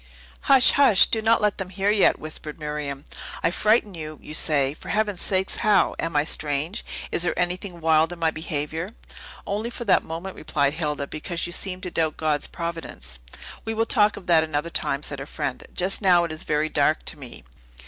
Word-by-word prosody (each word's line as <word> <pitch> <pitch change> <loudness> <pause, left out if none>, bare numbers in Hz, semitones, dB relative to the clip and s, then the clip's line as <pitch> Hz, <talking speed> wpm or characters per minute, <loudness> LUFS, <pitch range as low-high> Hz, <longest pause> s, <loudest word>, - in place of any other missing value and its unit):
"Hush, 270 -2 +7
hush? 270 -9 +6
do 220 - -1
not 225 +1 +3
let 210 0 +1
them 190 -1 -4
hear 195 +2 0
yet!" 210 -2 +4
whispered 155 0 -6
Miriam. 150 -2 -5 0.4
"I 165 - +2
frighten 215 +1 +2
you, 155 -2 -7
you 150 - -10
say; 145 -3 +3
for - - -11
Heaven's 210 -3 0
sake, 190 0 +1
how? 210 -3 +2
Am 165 - -3
I 145 - +4
strange? 155 +6 0 0.3
Is - - 0
there 175 - +1
anything 180 0 -2
wild 160 +1 +3
in 175 - -7
my 165 -1 +1
behavior?" 160 +2 -4 0.6
"Only 210 +3 -3
for 235 0 -7
that 190 -4 +4
moment," 170 +4 -6
replied 140 -1 0
Hilda, 150 -3 -2
"because 165 +4 -4
you 175 - -3
seemed 185 0 -3
to 180 - -4
doubt 160 -2 -1
God's 150 -2 0
providence." 165 - -6 0.4
"We 225 0 -3
will 225 +1 +1
talk 215 -2 +2
of 195 - -10
that 165 -2 +5
another 155 +1 -3
time," 140 -2 -1
said 140 -2 -2
her 135 - -7
friend. 150 -1 -4
"Just 185 +4 +1
now 180 -3 +5
it 170 - -3
is 155 - -4
very 150 +1 0
dark 155 +1 +1
to 155 - -4
me." 125 - -9
165 Hz, 200 wpm, -24 LUFS, 150-195 Hz, 0.6 s, Hush